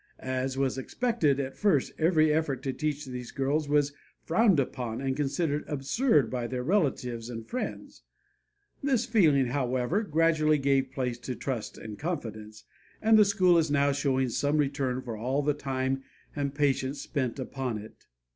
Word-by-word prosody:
As 130 0 -3
was 135 -1 0
expected, 165 - 0
at 135 -1 -3
first 190 -11 +1
every 155 -2 +4
effort 150 -4 -1
to 135 - -2
teach 150 0 -2
these 125 -2 -6
girls 145 +2 -1
was 145 -1 +2 0.3
frowned 185 0 +3
upon 125 -4 -2
and 135 0 -1
considered 150 +1 -1
absurd 145 - +2
by 125 -2 -2
their 125 0 -3
relatives 125 - 0
and 115 -2 -7
friends. 255 - -5 0.8
This 265 -5 +1
feeling, 155 - +4
however, 130 - 0
gradually 160 -4 +2
gave 135 -1 +1
place 125 -3 -2
to 125 0 -5
trust 120 -5 -4
and 110 -2 -8
confidence, 110 - -5 0.4
and 220 +1 +4
the 215 - +8
school 185 -4 +4
is 160 -1 +1
now 140 0 +3
showing 135 -2 +1
some 145 +5 0
return 135 -3 0
for 115 -3 -5
all 130 +6 -1
the 150 +1 +2
time 135 -1 -2 0.3
and 140 -1 -2
patience 140 -1 0
spent 135 -4 -2
upon 130 -3 -3
it. 105 +1 -12
140 Hz, 160 wpm, -28 LUFS, 130-155 Hz, 0.8 s, the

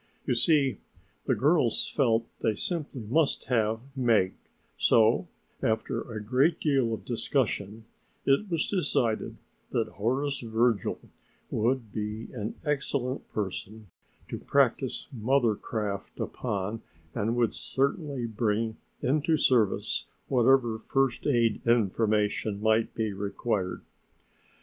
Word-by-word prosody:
You - - +1
see, 140 +1 +3 0.5
the - - +3
girls 140 -1 +3
felt 115 -5 +2
they 110 - +1
simply 150 - -3
must 140 +8 +1
have 110 -2 +1
Meg, 115 -8 +3 0.4
so 110 0 +4 0.3
after 110 0 0
a 110 - -4
great 130 +9 +2
deal 135 -6 +2
of 110 - -4
discussion 110 -3 -1 0.4
it 140 +10 +2
was 165 -2 0
decided 135 - 0 0.3
that - - 0
Horace 135 +7 -1
Virgil 115 -2 +1 0.5
would 120 -1 0
be 105 +1 -4
an 110 -3 -4
excellent 140 -3 -1
person 105 0 -5 0.4
to - - -5
practice - - +1
mother 120 0 +2
craft 105 -2 -4
upon 105 +2 -3 0.3
and 115 +2 0
would 120 -2 +2
certainly 140 -1 -1
bring 110 0 -1 0.3
into 155 +4 +2
service 120 -8 +2 0.2
whatever 120 -3 +3
first 135 +3 0
aid 120 -5 +2
information 105 -2 +1
might 110 +1 +2
be 110 -3 -1
required. 100 -1 -2
115 Hz, 110 wpm, -28 LUFS, 110-135 Hz, 0.5 s, so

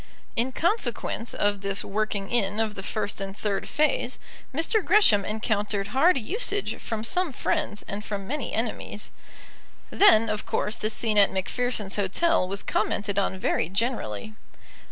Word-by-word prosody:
In 245 +3 0
consequence 260 - -1
of 205 -1 0
this 195 0 0
working 205 -1 -2
in 210 -3 +1
of 220 -1 0
the 195 - -6
first 205 0 -3
and 195 +1 -5
third 200 -2 -2
phase, 305 +12 +1 0.3
Mr. 330 - +1
Gresham 340 - +5
encountered 210 -2 -1
hard 315 +7 +4
usage 405 - -1
from 220 -1 -4
some 360 +7 +1
friends 270 -6 -1
and 205 +1 -4
from 200 -2 -4
many 285 -1 -3
enemies. 220 -2 -2 0.8
Then, 230 - +6
of 215 -1 -2
course, 210 - -1
the 215 - -2
scene 220 -1 +2
at 200 - +5
Macpherson's 210 +1 -2
Hotel 205 - +2
was 195 +1 -2
commented 205 -1 0
on 190 -1 0
very 165 -3 0
generally. 215 - -2
215 Hz, 150 wpm, -26 LUFS, 200-260 Hz, 0.8 s, Then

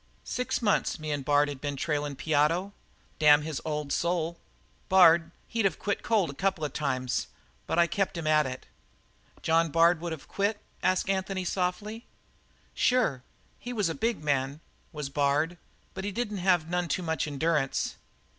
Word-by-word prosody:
"Six 250 -1 -2
months, 205 -2 +2
me 155 -1 -5
and 145 -2 -2
Bard 145 +1 +3
had 140 -2 -6
been 145 -1 -3
trailin' 145 0 -2
Piotto, 160 +7 +1 0.5
damn 150 -1 +6
his 155 -2 -4
old 150 -2 -2
soul! 170 -1 -1 0.5
Bard 170 -3 +6 0.2
he'd 225 -3 +1
of 180 - -4
quit 200 -1 -2
cold 210 -9 +1
a - - -10
couple 190 0 -1
of 145 - -5
times, 130 -4 -1 0.4
but - - -1
I 170 - +6
kept 190 +2 -1
him 165 - -4
at 155 -2 +4
it." 130 0 -7 0.8
"John 165 0 +3
Bard 165 +2 +4
would 170 -1 -4
have 160 -3 -7
quit?" 200 +1 -1 0.2
asked 185 0 +1
Anthony 190 -1 -1
softly. 205 +6 -2 0.7
"Sure. 230 - +2 0.4
He 245 - -6
was 205 -7 +1
a - - -1
big 225 -3 -1
man, 140 0 0 0.3
was 150 -4 -5
Bard, 145 +4 +1 0.4
but 190 - -6
he 205 - -2
didn't 210 -1 -3
have 180 -3 +2
none 175 0 -1
too 180 +4 -1
much 160 -3 -1
endurance." 150 -1 0
165 Hz, 170 wpm, -28 LUFS, 150-190 Hz, 0.8 s, damn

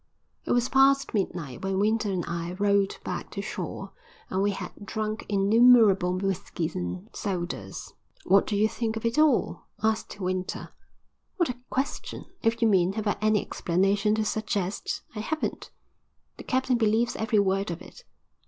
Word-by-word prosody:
It - - -2
was 245 0 +2
past 275 +1 +4
midnight 175 - -2
when 190 0 -1
Winter 215 +1 +1
and 180 -3 -2
I 170 +1 -3
rowed 200 0 +1
back - - -4
to - - -3
shore - - -5 0.4
and 190 - +1
we 200 - +3
had 200 - -4
drunk 215 +1 -3
innumerable 200 -3 +5
whiskies 185 -3 -2
and 90 0 -4
sodas. 175 - -4 0.3
"What 195 +1 +4
do 210 - -1
you 210 +2 +4
think 225 0 -2
of 225 - -5
it 230 +5 +1
all?" 305 -5 +2 0.2
asked 220 -2 -1
Winter. 185 -1 -3 0.7
"What 345 -6 +2
a 250 - -4
question! 265 +2 -3 0.2
If 230 +1 +1
you - - +6
mean, 190 -3 +3
have 220 +1 -3
I 205 - +1
any 215 -1 +3
explanation 195 +4 +1
to 220 0 0
suggest, 210 -3 -2
I 215 - -5
haven't." 310 +9 -3 0.7
"The - - -10
captain 260 -2 +1
believes 225 +1 +2
every 220 0 0
word 195 -1 +2
of 170 0 -4
it." - - -14
205 Hz, 160 wpm, -27 LUFS, 190-225 Hz, 0.7 s, you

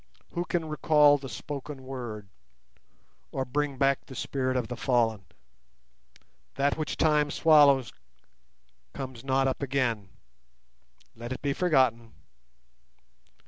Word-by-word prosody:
Who 175 0 -3
can 175 -2 -1
recall 150 -1 +4
the 135 -1 -8
spoken 140 +3 -7
word, 120 -6 -7 1.0
or 130 - -2
bring 145 +1 -2
back 135 0 +2
the 130 - -10
spirit 130 0 -2
of 120 -3 -2
the 125 - -5
fallen? 115 -6 0 1.3
That 140 +1 +1
which 155 - -4
Time 150 -2 +3
swallows 145 -5 +4 1.0
comes 130 -3 -7
not 135 0 +1
up 130 - -2
again. 125 -7 -1 1.1
Let 120 +2 -8
it 130 - -6
be 140 -1 0
forgotten! 130 -9 +1
135 Hz, 115 wpm, -28 LUFS, 125-145 Hz, 1.3 s, recall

